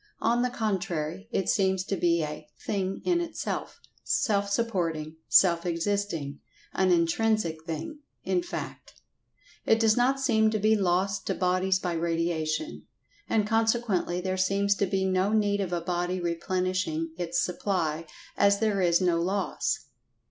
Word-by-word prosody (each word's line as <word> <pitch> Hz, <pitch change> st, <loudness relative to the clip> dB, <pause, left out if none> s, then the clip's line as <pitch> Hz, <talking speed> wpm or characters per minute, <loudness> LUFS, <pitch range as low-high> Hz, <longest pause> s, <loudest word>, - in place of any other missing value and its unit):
On 235 Hz, +2 st, +2 dB
the 250 Hz, -, +1 dB
contrary, 190 Hz, -5 st, -3 dB
it 195 Hz, -5 st, -1 dB
seems 190 Hz, -2 st, +2 dB
to 195 Hz, -, -2 dB
be 170 Hz, -2 st, +2 dB
a 150 Hz, 0 st, -6 dB, 0.2 s
"thing 195 Hz, -2 st, -2 dB
in 350 Hz, -1 st, +2 dB
itself," 335 Hz, -1 st, -4 dB, 0.2 s
self 200 Hz, -5 st, +1 dB
supporting, 165 Hz, -8 st, -1 dB
self 170 Hz, -3 st, +5 dB
existing—an 175 Hz, -1 st, -2 dB
intrinsic 170 Hz, -1 st, +1 dB
thing, 290 Hz, -, -5 dB, 0.2 s
in 360 Hz, -, +1 dB
fact. 345 Hz, -, -7 dB, 0.7 s
It 225 Hz, -, +3 dB
does 220 Hz, -1 st, +4 dB
not 260 Hz, +3 st, +2 dB
seem 220 Hz, -5 st, +3 dB
to 215 Hz, -, 0 dB
be 215 Hz, +1 st, +3 dB
lost 190 Hz, 0 st, 0 dB
to -, -, 0 dB
bodies 185 Hz, +1 st, +2 dB
by 180 Hz, -2 st, -3 dB
radiation. 165 Hz, -, -2 dB, 0.4 s
And 215 Hz, -2 st, +2 dB
consequently 225 Hz, -5 st, +1 dB
there 185 Hz, 0 st, -2 dB
seems 200 Hz, +2 st, +2 dB
to 200 Hz, -, +1 dB
be 190 Hz, -1 st, 0 dB
no 190 Hz, +2 st, +1 dB
need 205 Hz, -2 st, +2 dB
of 185 Hz, -3 st, -3 dB
a 175 Hz, -1 st, -1 dB
body 175 Hz, +1 st, -1 dB
replenishing 175 Hz, -1 st, -1 dB
its 175 Hz, 0 st, -1 dB
supply, 165 Hz, -4 st, -1 dB, 0.3 s
as 200 Hz, 0 st, +4 dB
there 210 Hz, -2 st, +1 dB
is 170 Hz, 0 st, +3 dB
no 175 Hz, -2 st, +2 dB
loss. 195 Hz, +3 st, -1 dB
190 Hz, 145 wpm, -27 LUFS, 170-210 Hz, 0.7 s, self